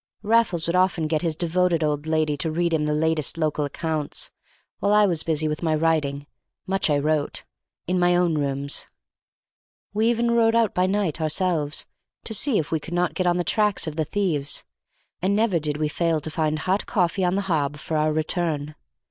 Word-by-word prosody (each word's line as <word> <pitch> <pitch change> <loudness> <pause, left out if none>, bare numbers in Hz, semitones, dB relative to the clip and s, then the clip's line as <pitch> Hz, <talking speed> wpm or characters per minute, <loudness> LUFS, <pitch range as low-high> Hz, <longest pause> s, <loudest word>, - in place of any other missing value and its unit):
Raffles 215 -6 +2
would 170 - 0
often 180 -3 +2
get 155 0 0
his 165 -3 -1
devoted 175 0 +1
old 150 0 -1
lady 155 -2 +1
to 150 +3 -1
read 170 +1 0
him 155 -2 +1
the 150 - 0
latest 160 0 0
local 155 -2 0
accounts, 155 +1 -2 0.5
while 200 - +1
I 210 0 +6
was 170 -5 +1
busy 155 -1 0
with 150 0 -3
my 160 -2 +1
writing 150 -3 0 0.4
(much 190 -2 0
I 145 - +3
wrote) 150 0 0 0.4
in 180 +1 0
my 175 0 +3
own 175 -2 +2
room. 140 -1 -2 1.3
We 220 +2 +2
even 235 0 +1
rode 230 -1 +3
out 230 -3 +2
by 180 0 +2
night 190 -5 -1
ourselves, 155 -2 0 0.4
to 220 - -5
see 245 +1 +4
if 155 - -2
we 160 - +1
could 170 +3 -6
not 180 0 +1
get 185 - -1
on 175 0 +2
the 175 - 0
tracks 210 +1 +1
of 155 -2 -5
the 160 - 0
thieves, 155 -5 0 0.6
and 195 +3 +1
never 210 -5 +2
did 150 -1 -2
we 155 0 0
fail 165 +1 0
to 160 - -5
find 155 -1 0
hot 185 +5 -1
coffee 185 -2 0
on 180 +1 +1
the 200 - +1
hob 150 -6 -1
for 155 +2 -4
our 155 0 +2
return. 155 -1 -1
165 Hz, 200 wpm, -24 LUFS, 155-185 Hz, 1.3 s, I